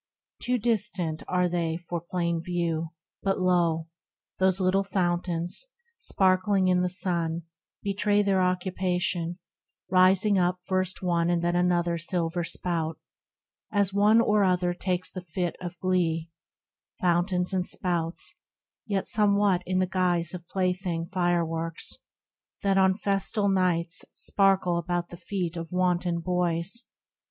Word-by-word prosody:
Too 250 +1 +1
distant 205 -8 -1
are 180 0 +2
they 170 -2 -1
for 175 -1 -5
plain 170 -1 -1
view, 170 -2 -1 0.3
but 195 -1 0
lo! 170 -3 +2 0.5
Those 190 0 +3
little 190 +1 +2
fountains, 175 - -1 0.3
sparkling 190 - +2
in 180 0 +3
the 180 - +1
sun, 170 -3 -1 0.4
Betray 205 +1 +2
their 195 -2 +2
occupation, 180 -1 0 0.5
rising 190 +2 +4
up 180 0 +1
First 185 -1 -1
one 170 -1 +1
and 170 -1 +1
then 175 0 +1
another 175 -1 +2
silver 170 0 -1
spout, 165 -1 -2 0.7
As 200 -2 +2
one 210 +3 +5
or 210 -2 +3
other 180 -1 +2
takes 180 0 -2
the 185 - -6
fit 180 0 -3
of 175 0 -6
glee, 170 -3 0 0.7
Fountains 180 +1 +1
and 185 -1 +1
spouts, 170 -2 -2 0.5
yet 200 -2 0
somewhat 200 -3 +3
in 185 0 0
the 185 - +3
guise 180 -2 0
Of 175 -2 -8
plaything 180 -3 -1
fireworks, 165 -2 -1 0.6
that 195 -1 +3
on 190 0 +4
festal 200 0 0
nights 175 -3 +1
Sparkle 190 -3 +2
about 175 0 -2
the 175 - -9
feet 180 -2 -3
of 165 -1 -6
wanton 180 -1 +1
boys. 180 +5 -1
180 Hz, 130 wpm, -27 LUFS, 170-190 Hz, 0.7 s, one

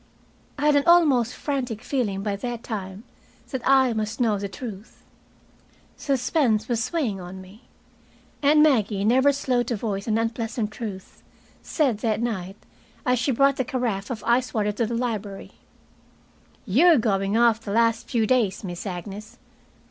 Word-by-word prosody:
I 290 - -2
had 300 -1 +4
an 285 - +3
almost 290 -9 +4
frantic 250 -6 -3
feeling 220 -8 -2
by 205 -1 -1
that 240 +2 -5
time 195 -2 -6 0.5
that 260 -3 -3
I 265 -2 +4
must 215 +1 -3
know 220 -5 +1
the 200 0 -4
truth. 210 -1 -9 0.9
Suspense 250 -5 0
was 235 0 -1
weighing 240 - -1
on 180 +1 -9
me. 190 +5 -15 0.8
And 300 +1 +5
Maggie, 215 -9 +2
never 260 +5 +4
slow 260 -3 0
to 240 0 -2
voice 200 -1 -4
an 220 0 +1
unpleasant 225 -1 -2
truth, 200 -4 -8 0.4
said 265 -10 0
that 220 -1 0
night, 195 -5 -3 0.5
as 250 -1 +2
she 250 +3 +1
brought 275 +2 +3
the 260 - +1
carafe 235 -6 -2
of 225 -5 -5
ice 245 +2 +1
water 210 -1 +1
to 220 +2 -1
the 235 - -3
library, 220 -5 -4 1.1
"You're 300 - +5
going 200 -2 +1
off 235 -1 +4
the 205 - -6
last 230 +1 +1
few 230 -4 +1
days, 215 -5 +1
Miss 175 +1 -6
Agnes." 200 +4 -7
230 Hz, 155 wpm, -24 LUFS, 205-255 Hz, 1.1 s, And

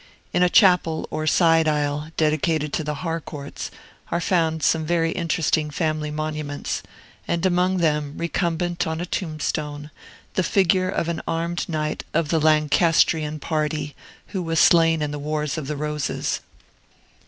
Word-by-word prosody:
In - - +2
a 180 - +5
chapel 180 -5 +4
or 155 0 -2
side 165 0 +4
aisle, 150 0 0
dedicated 155 -1 +1
to 160 - -1
the 150 0 -3
Harcourts, 155 -3 -5 0.4
are 170 - 0
found 165 -3 +1
some 160 -1 +2
very 165 0 +1
interesting 160 -2 0
family 155 -1 -1
monuments, 150 -1 -3 0.5
and 170 +2 0
among 185 +1 +2
them, 150 -3 0
recumbent 170 0 -1
on 160 0 -2
a 175 - -2
tombstone, 155 -4 -3 0.4
the - - +1
figure 185 0 +2
of 170 - -1
an 170 -1 -2
armed 170 +2 -2
knight 155 -2 -2
of 165 -2 +1
the 165 - +2
Lancastrian 155 0 +3
party, 150 -1 -2 0.3
who 190 - -3
was 165 -2 0
slain 165 -3 +5
in 150 - -2
the 150 - -4
Wars 150 -1 -2
of 150 -4 -5
the 150 0 -3
Roses. 150 0 -2
160 Hz, 150 wpm, -23 LUFS, 150-170 Hz, 0.5 s, a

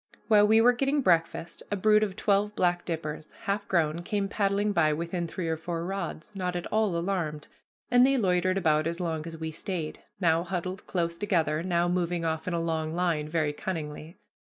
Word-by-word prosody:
While 210 -1 +6
we 220 +1 +6
were 245 +2 +6
getting 275 +4 +1
breakfast 170 -2 +1
a 205 - 0
brood 215 +2 +4
of 200 -3 -1
twelve 210 0 +1
black 175 -1 +1
dippers, 155 -2 -5
half 200 +1 -2
grown, 165 -2 +1
came 200 +2 -1
paddling 200 +1 +1
by 155 -5 +3
within 170 +2 -3
three 170 +1 -4
or 160 0 0
four 165 +1 -4
rods, 195 0 -5
not 180 -2 -2
at 175 - -3
all 215 -5 +2
alarmed; 170 -4 -2 0.5
and 245 0 +6
they 270 +1 +4
loitered 185 -3 +2
about 155 -3 +2
as 170 +1 -3
long 165 -2 -2
as 165 -1 -7
we 160 0 -4
stayed, 165 -1 -4 0.2
now 165 -3 +3
huddled 185 +1 -4
close 170 -2 -1
together, 165 -6 +1
now 175 -1 +1
moving 175 -1 0
off 160 +1 -2
in 180 - 0
a - - 0
long 160 -1 -2
line, 165 -4 0
very 155 -2 0
cunningly. 155 0 -5
175 Hz, 195 wpm, -28 LUFS, 165-195 Hz, 0.5 s, While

